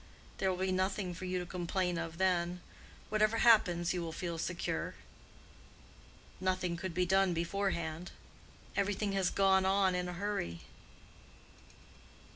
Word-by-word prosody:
There 190 Hz, -, +2 dB
will 185 Hz, -, -1 dB
be 190 Hz, 0 st, 0 dB
nothing 185 Hz, 0 st, 0 dB
for 185 Hz, +2 st, -7 dB
you 185 Hz, 0 st, -1 dB
to 180 Hz, -, -3 dB
complain 180 Hz, 0 st, -1 dB
of 165 Hz, 0 st, -5 dB
then. 180 Hz, -1 st, +1 dB, 0.5 s
Whatever 215 Hz, +1 st, +2 dB
happens, 180 Hz, -8 st, +4 dB
you 180 Hz, -, -2 dB
will 165 Hz, -1 st, -4 dB
feel 170 Hz, 0 st, -4 dB
secure. 175 Hz, +1 st, -2 dB, 1.4 s
Nothing 185 Hz, -2 st, 0 dB
could 175 Hz, 0 st, -5 dB
be 180 Hz, 0 st, +2 dB
done 190 Hz, -1 st, +3 dB
beforehand. 170 Hz, -2 st, -2 dB, 0.7 s
Every 200 Hz, 0 st, +1 dB
thing 205 Hz, 0 st, -1 dB
has 195 Hz, -2 st, +1 dB
gone 190 Hz, -1 st, +4 dB
on 190 Hz, 0 st, +3 dB
in 180 Hz, 0 st, -1 dB
a -, -, -4 dB
hurry." 175 Hz, -, -3 dB
185 Hz, 140 wpm, -33 LUFS, 175-195 Hz, 1.4 s, happens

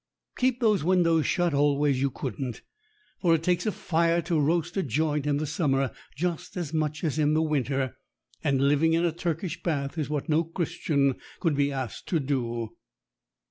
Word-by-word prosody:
Keep 255 Hz, -1 st, +1 dB
those 215 Hz, -6 st, +3 dB
windows 165 Hz, -3 st, +3 dB
shut 175 Hz, -4 st, +1 dB
always 145 Hz, -1 st, +2 dB
you 140 Hz, -, +2 dB
couldn't. 130 Hz, -2 st, -5 dB, 0.6 s
For 170 Hz, -3 st, +4 dB
it 160 Hz, -, -2 dB
takes 180 Hz, +5 st, +1 dB
a -, -, +2 dB
fire 170 Hz, -4 st, +1 dB
to 165 Hz, -1 st, 0 dB
roast 170 Hz, +3 st, +1 dB
a 195 Hz, -, +1 dB
joint 150 Hz, +1 st, 0 dB
in 145 Hz, -1 st, +2 dB
the 155 Hz, -, -1 dB
summer 135 Hz, -3 st, 0 dB, 0.2 s
just 175 Hz, +4 st, -3 dB
as 165 Hz, -4 st, -4 dB
much 155 Hz, 0 st, -1 dB
as 155 Hz, -1 st, 0 dB
in 150 Hz, 0 st, +3 dB
the 160 Hz, -, +3 dB
winter, 135 Hz, -3 st, -1 dB, 0.5 s
and 140 Hz, -1 st, +2 dB
living 150 Hz, +3 st, +3 dB
in 165 Hz, +1 st, +2 dB
a 170 Hz, -, +2 dB
Turkish 170 Hz, +1 st, -3 dB
bath 145 Hz, -1 st, -2 dB
is 150 Hz, -, -2 dB
what 150 Hz, 0 st, -2 dB
no 160 Hz, +1 st, +3 dB
Christian 160 Hz, -5 st, 0 dB, 0.2 s
could 165 Hz, -4 st, +1 dB
be 140 Hz, 0 st, +2 dB
asked 130 Hz, -5 st, -5 dB
to 165 Hz, -, +1 dB
do. 120 Hz, -5 st, -2 dB
155 Hz, 180 wpm, -27 LUFS, 140-170 Hz, 0.6 s, For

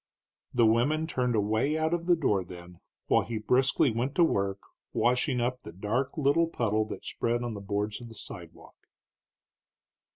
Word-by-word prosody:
The 120 Hz, -2 st, +3 dB
women 130 Hz, +8 st, +2 dB
turned 125 Hz, -6 st, -1 dB
away 110 Hz, +8 st, +1 dB
out 160 Hz, +1 st, 0 dB
of 170 Hz, 0 st, -2 dB
the 175 Hz, -, +6 dB
door 105 Hz, -, +1 dB
then, 90 Hz, 0 st, -12 dB, 0.3 s
while -, -, +3 dB
he 115 Hz, -1 st, -4 dB
briskly 130 Hz, +4 st, +2 dB
went 120 Hz, +5 st, -2 dB
to 175 Hz, -, +5 dB
work 100 Hz, -9 st, 0 dB, 0.3 s
washing 125 Hz, +2 st, +1 dB
up 125 Hz, +1 st, -1 dB
the -, -, -9 dB
dark 120 Hz, -, -2 dB
little 155 Hz, +3 st, +3 dB
puddle 110 Hz, -8 st, 0 dB
that 110 Hz, -, -8 dB
spread 120 Hz, +1 st, -1 dB
on 120 Hz, -2 st, -3 dB
the 100 Hz, -, -7 dB
boards 105 Hz, +2 st, -2 dB
of 120 Hz, -, -9 dB
the 115 Hz, -, -12 dB
sidewalk. -, -, -12 dB
120 Hz, 170 wpm, -29 LUFS, 105-140 Hz, 0.3 s, the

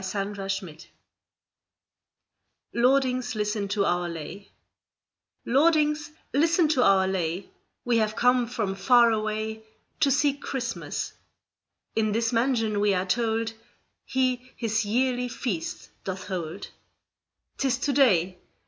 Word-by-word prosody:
William 200 Hz, +1 st, -2 dB
Morris 195 Hz, -5 st, -5 dB, 1.9 s
LORDINGS, 255 Hz, -1 st, +2 dB
LISTEN 210 Hz, -1 st, -1 dB
TO 200 Hz, 0 st, 0 dB
OUR 175 Hz, -1 st, 0 dB
LAY 170 Hz, +5 st, -8 dB, 1.0 s
Lordings, 300 Hz, +2 st, +3 dB, 0.2 s
listen 325 Hz, +4 st, +3 dB
to 275 Hz, -5 st, +2 dB
our 195 Hz, -4 st, +4 dB
lay 185 Hz, 0 st, -2 dB, 0.3 s
We 240 Hz, -1 st, +2 dB
have 215 Hz, -1 st, +1 dB
come 245 Hz, 0 st, +3 dB
from 220 Hz, -5 st, -2 dB
far 235 Hz, +4 st, +5 dB
away 215 Hz, 0 st, -2 dB, 0.4 s
To 290 Hz, -, +4 dB
seek 285 Hz, +1 st, +2 dB
Christmas; 250 Hz, -4 st, -4 dB, 0.8 s
In 215 Hz, -1 st, +1 dB
this 230 Hz, +1 st, 0 dB
mansion 230 Hz, -3 st, +1 dB
we 205 Hz, -1 st, +3 dB
are 180 Hz, +1 st, 0 dB
told 225 Hz, +2 st, 0 dB, 0.5 s
He 255 Hz, -1 st, -1 dB
His 220 Hz, -2 st, -1 dB
yearly 250 Hz, +3 st, +1 dB
feast 225 Hz, -8 st, -4 dB
doth 190 Hz, 0 st, -5 dB
hold: 180 Hz, 0 st, -5 dB, 0.9 s
'Tis 265 Hz, -2 st, +1 dB
to 280 Hz, +2 st, -1 dB
day! 185 Hz, -10 st, +3 dB
225 Hz, 115 wpm, -26 LUFS, 195-255 Hz, 1.9 s, far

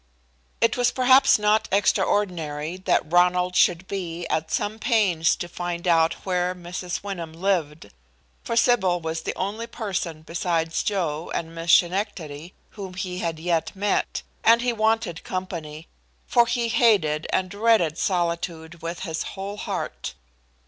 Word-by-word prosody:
It 230 Hz, -, +3 dB
was 245 Hz, 0 st, +3 dB
perhaps 260 Hz, +2 st, +5 dB
not 210 Hz, +1 st, +2 dB
extraordinary 175 Hz, -5 st, 0 dB
that 185 Hz, -4 st, 0 dB
Ronald 180 Hz, +1 st, +3 dB
should 180 Hz, +1 st, +3 dB
be 175 Hz, -3 st, -4 dB
at 160 Hz, 0 st, -1 dB
some 215 Hz, +2 st, -2 dB
pains 190 Hz, -9 st, +2 dB
to 175 Hz, -, -5 dB
find 175 Hz, 0 st, -4 dB
out 165 Hz, -1 st, +4 dB
where 180 Hz, -1 st, 0 dB
Mrs. 180 Hz, +1 st, -5 dB
Wyndham 175 Hz, -5 st, -5 dB
lived, 165 Hz, -, -1 dB, 0.5 s
for 230 Hz, -, -3 dB
Sybil 190 Hz, -7 st, +3 dB
was 160 Hz, 0 st, -3 dB
the -, -, -4 dB
only 215 Hz, +5 st, -3 dB
person 185 Hz, -9 st, -4 dB
besides 165 Hz, -1 st, -1 dB
Joe 170 Hz, -6 st, -2 dB
and 165 Hz, 0 st, -4 dB
Miss 165 Hz, 0 st, -1 dB
Schenectady 175 Hz, -4 st, +1 dB, 0.2 s
whom 190 Hz, -3 st, -8 dB
he 180 Hz, -1 st, -4 dB
had 165 Hz, -2 st, -2 dB
yet 165 Hz, +2 st, -1 dB
met, 205 Hz, +2 st, -1 dB, 0.2 s
and 230 Hz, +1 st, +5 dB
he 245 Hz, -1 st, +1 dB
wanted 220 Hz, -5 st, 0 dB
company, 165 Hz, -4 st, -5 dB, 0.4 s
for 235 Hz, -1 st, +4 dB
he 235 Hz, 0 st, 0 dB
hated 180 Hz, -11 st, +3 dB
and 185 Hz, -1 st, 0 dB
dreaded 205 Hz, -7 st, +2 dB
solitude 170 Hz, -2 st, -2 dB
with 170 Hz, +1 st, -5 dB
his 160 Hz, -4 st, -3 dB, 0.2 s
whole 200 Hz, +2 st, -5 dB
heart. 60 Hz, -, -4 dB
180 Hz, 140 wpm, -24 LUFS, 165-205 Hz, 0.5 s, perhaps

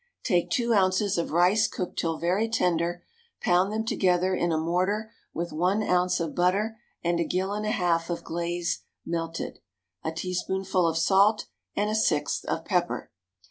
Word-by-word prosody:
Take 175 Hz, -7 st, +1 dB
two 235 Hz, -1 st, +1 dB
ounces 190 Hz, -1 st, +2 dB
of 170 Hz, -, -2 dB
rice 180 Hz, +6 st, +4 dB
cooked 180 Hz, -, -4 dB
till 165 Hz, -1 st, -1 dB
very 185 Hz, +7 st, +1 dB
tender, 175 Hz, -4 st, 0 dB, 0.4 s
pound 180 Hz, +3 st, +2 dB
them 220 Hz, +1 st, -2 dB
together 185 Hz, -3 st, +2 dB
in 175 Hz, -2 st, +1 dB
a 160 Hz, -, +1 dB
mortar 185 Hz, +7 st, 0 dB, 0.2 s
with 170 Hz, +1 st, -4 dB
one 185 Hz, +7 st, +1 dB
ounce 180 Hz, -1 st, +2 dB
of 165 Hz, -2 st, -2 dB
butter 200 Hz, +5 st, +1 dB, 0.2 s
and 170 Hz, 0 st, +1 dB
a -, -, +3 dB
gill 185 Hz, +4 st, -1 dB
and 210 Hz, +1 st, -2 dB
a -, -, +1 dB
half 175 Hz, -6 st, +1 dB
of 170 Hz, -, -3 dB
glaze 170 Hz, +1 st, -2 dB, 0.2 s
melted, 165 Hz, 0 st, -4 dB, 0.4 s
a 160 Hz, -, -1 dB
teaspoonful 185 Hz, +1 st, -1 dB
of 165 Hz, -1 st, 0 dB
salt, 195 Hz, +5 st, +4 dB, 0.3 s
and 210 Hz, +1 st, 0 dB
a -, -, 0 dB
sixth 165 Hz, -9 st, +1 dB
of -, -, -2 dB
pepper. -, -, -1 dB
180 Hz, 170 wpm, -27 LUFS, 170-205 Hz, 0.4 s, rice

